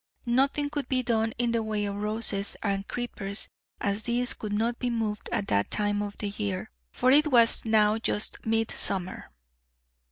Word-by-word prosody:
Nothing 275 +4 +1
could 290 -4 -3
be 255 -1 +1
done 225 -2 +1
in 240 -1 0
the 230 -1 +1
way 215 -1 -2
of 200 0 -3
roses 210 -1 +1
and 195 -2 -1
creepers, 205 -4 -4 0.3
as 200 +1 -1
these 240 +2 0
could 215 - -6
not 230 +3 0
be 250 - -1
moved 220 -3 -3
at 200 - -1
that 100 0 +1
time 205 -1 0
of 205 -1 -6
year, 105 - -3 0.2
for 255 - +2
it 300 +3 +5
was 235 -6 +5
now 215 -1 +3
just 210 -1 -2
midsummer. 220 -4 0
220 Hz, 165 wpm, -27 LUFS, 205-240 Hz, 0.3 s, it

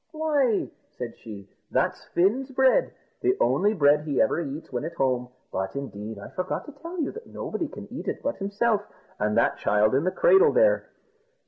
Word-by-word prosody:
"Why," 290 -8 +1 0.3
said 120 -2 -5
she, 100 -4 -10 0.2
"that's - - 0
Fin's 225 +10 +1
bread 265 - +3 0.3
the 380 +1 +2
only 210 +3 +2
bread 145 -3 +4
he 150 -3 -2
ever - - +2
eats 145 0 -6
when 125 +1 -2
at 165 +2 -5
home; 125 -3 0 0.2
but, 95 +5 -3
indeed, 110 -6 -6
I 100 - -9
forgot 185 0 -3
to 295 - -9
tell 335 +5 -8
you 300 - -1
that 455 +1 -10
nobody - - -4
can - - -10
eat - - -6
it - - -3
but 285 - -1
himself, 205 +2 +1 0.4
and 105 +1 +1
that 115 - +3
child 105 +2 +3
in 135 +3 +2
the 185 - +2
cradle 385 - +5
there. - - +3
180 Hz, 190 wpm, -26 LUFS, -, 0.4 s, cradle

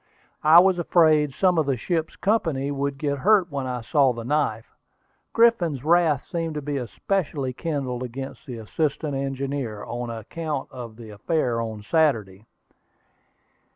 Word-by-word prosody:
I 160 +3 +8
was 185 0 +4
afraid 155 -5 +3
some 180 -3 +3
of 155 - 0
the 135 -2 +1
ship's 160 +4 -2
company 160 -10 0
would 140 0 -2
get 140 -1 -2
hurt 190 -1 +3
when 135 -2 -3
I 125 -1 -3
saw 130 +2 +3
the 115 -1 -6
knife. 150 +5 -1 0.6
Griffin's 180 - +3
wrath 160 -3 +3
seemed 165 -2 -3
to 150 - -3
be 145 0 -2
especially 140 0 -2
kindled 135 -5 -3
against 135 +4 -7
the 125 -3 -6
assistant 145 +6 -2
engineer, 135 -4 -3
on 120 0 -5
account 140 +6 -5
of 120 -3 -8
the 110 -1 -11
affair 120 +1 -1
on 110 -2 -5
Saturday. 110 - 0
140 Hz, 150 wpm, -24 LUFS, 125-160 Hz, 0.6 s, I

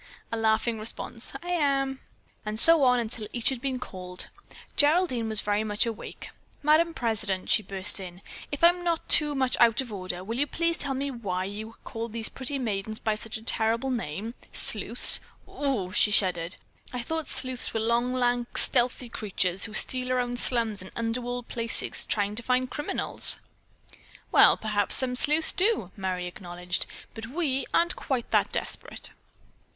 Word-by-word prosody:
A - - -1
laughing 225 0 +1
response: 225 +1 -5
"I 350 - -7
am!" 275 -5 0 0.4
And 215 0 -2
so 330 +4 +8
on 250 -1 +4
until 225 -2 -5
each 240 -2 +1
had 260 -3 -4
been 265 -1 -2
called. 180 -6 -6 0.5
Geraldine 290 -7 +2
was 215 -1 +2
very 205 +1 0
much 210 0 0
awake. 230 -2 -7 0.3
"Madame 320 +3 +3
President," 210 -5 -1
she - - +5
burst 195 0 0
in, 180 0 -9 0.3
"if 285 +2 -5
I'm 350 +1 +5
not 335 -2 -1
too 295 -2 +4
much 260 -2 +1
out 235 0 +5
of 250 -5 -3
order, 185 -2 -5
will 230 +5 -4
you 290 - +1
please 335 +3 0
tell 275 -2 -3
me 275 +1 -2
why 195 -7 -3
you 215 +3 -7
call 230 0 -5
these 225 0 -3
pretty 270 +2 -4
maidens 215 -3 -3
by 220 - 0
such 215 +1 -4
a 220 - -13
terrible 230 +3 +1
name? 225 -1 -4 0.2
Sleuths! - - +2 0.3
Ohoo!" 250 -11 -2
she 210 - +4
shuddered. 180 -3 +2 0.3
"I 250 -1 -3
thought 320 +2 -3
sleuths 255 -2 0
were 225 - -2
long, 235 +2 +1
lank, 245 -1 -1
stealthy 250 0 +3
creatures 190 -5 -1
who 215 -1 -7
steal 255 +2 +4
around 245 -1 -1
slums 230 -6 +1
and 185 - -10
underworld 245 +1 -3
places 230 -1 -4
trying 205 -1 +1
to - - -1
find 255 +1 0
criminals." 295 - +1 0.9
"Well, - - +6
perhaps 210 -2 +2
some 255 -1 +3
sleuths 300 +5 +3
do," 385 - +1
Merry 185 -3 -3
acknowledged, 175 0 -5 0.3
"but 225 0 -7
we 275 -1 -2
aren't 340 +1 +2
quite 255 -4 -3
that - - +2
desperate." - - +1
235 Hz, 165 wpm, -27 LUFS, 210-265 Hz, 0.9 s, so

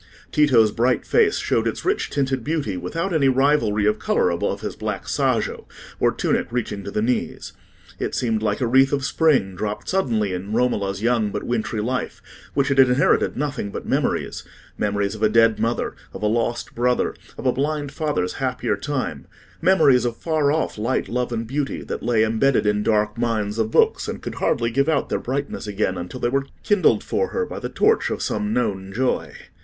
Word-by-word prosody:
Tito's 125 -8 +4
bright 120 +3 +1
face 440 -3 +3
showed - - 0
its - - -4
rich 395 +3 0
tinted 135 -3 -1
beauty 145 - -2
without 165 - -3
any 140 -4 +3
rivalry 130 -6 +2
of 105 0 +2
colour 90 - +1
above 85 - -2
his - - -4
black - - -4
sajo - - -1 0.3
or - - +3
tunic - - 0
reaching 110 -5 -3
to 100 - -6
the 105 +1 -1
knees. 125 +2 -2 0.5
It - - -2
seemed 115 -3 0
like 105 +1 -1
a - - +2
wreath 135 +3 +4
of 140 -2 0
spring, 145 - +2
dropped 105 +2 -4
suddenly 115 - 0
in 95 +4 -5
Romola's 105 -4 0
young 115 -3 +2
but - - -4
wintry 115 -2 -2
life, 125 +4 -3 0.4
which 140 0 +2
had 135 -1 +2
inherited 130 0 +4
nothing 140 -7 -2
but - - -6
memories—memories 100 -1 -2
of 110 - -9
a 110 - +4
dead 115 0 +4
mother, 115 +1 -1 0.2
of 100 - -7
a - - +2
lost 115 +2 -1
brother, 125 +1 +1 0.2
of - - -8
a 130 - +4
blind 145 0 -2
father's 145 - -1
happier - - 0
time—memories 155 -9 +1
of 120 -2 -2
far 155 -3 +1
off 155 -7 -1
light, 115 +5 -1
love, 125 0 -1
and 115 -1 -2
beauty, 140 +4 -3
that - - -5
lay 115 -2 +2
embedded 115 +3 +2
in 105 0 +2
dark 105 0 +1
mines 110 -2 -1
of 110 -1 +1
books, - - +2
and - - -5
could - - -4
hardly 115 -1 +1
give 140 +6 +1
out 155 -3 +1
their - - 0
brightness 135 -3 -4
again 100 -2 -1
until 90 +8 -6
they - - +1
were 135 +2 0 0.2
kindled 205 -3 +3
for 470 - 0
her 465 - -2
by - - -7
the - - -5
torch 440 +1 +2
of - - -3
some 210 0 -1
known 95 - -1
joy. 125 +5 -1
120 Hz, 190 wpm, -22 LUFS, 105-140 Hz, 0.5 s, Tito's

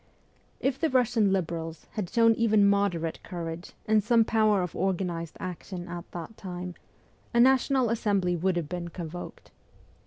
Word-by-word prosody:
If 270 0 0
the 320 - +2
Russian 240 -5 +3
Liberals 165 -3 -2
had 205 -6 -3
shown 230 +1 +5
even 215 -3 +4
moderate 195 -5 +1
courage 170 0 -6
and 215 -1 +3
some 230 +1 +4
power 215 -4 +3
of 180 - -5
organized 175 -3 -2
action 180 0 -6
at 175 0 -7
that 175 +6 -7
time, 180 -1 -6 0.6
a - - +5
National 260 -1 +4
Assembly 200 -6 +1
would 180 +2 +1
have 170 -4 -2
been 175 +1 -4
con 170 -2 -6
voked. 175 +1 -9
190 Hz, 155 wpm, -28 LUFS, 175-220 Hz, 0.6 s, shown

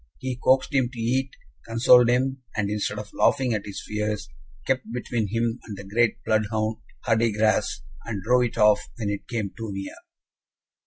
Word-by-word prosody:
He 130 - -3
coaxed 130 +3 +3
him 130 -3 +2
to 125 - -9
eat, 130 +4 0 0.3
consoled 120 +1 +5
him, 130 +2 +1
and, 105 -2 -1
instead 105 0 -2
of 105 0 -7
laughing 130 -3 +2
at 105 -1 -3
his 100 - -6
fears, 105 -2 -2 0.4
kept 130 -3 -1
between 120 -2 -2
him 115 +3 -1
and 105 -3 -8
the 100 - -8
great 110 +4 +1
bloodhound 110 0 0 0.3
Hardigras, 110 -1 +1 0.2
and 105 -5 -5
drove 125 +3 +4
it 120 - -5
off 105 -1 +4
when 105 -4 -2
it 100 - -5
came 110 -5 -2
too 115 -1 -6
near. 95 0 -5
115 Hz, 170 wpm, -25 LUFS, 105-125 Hz, 0.4 s, consoled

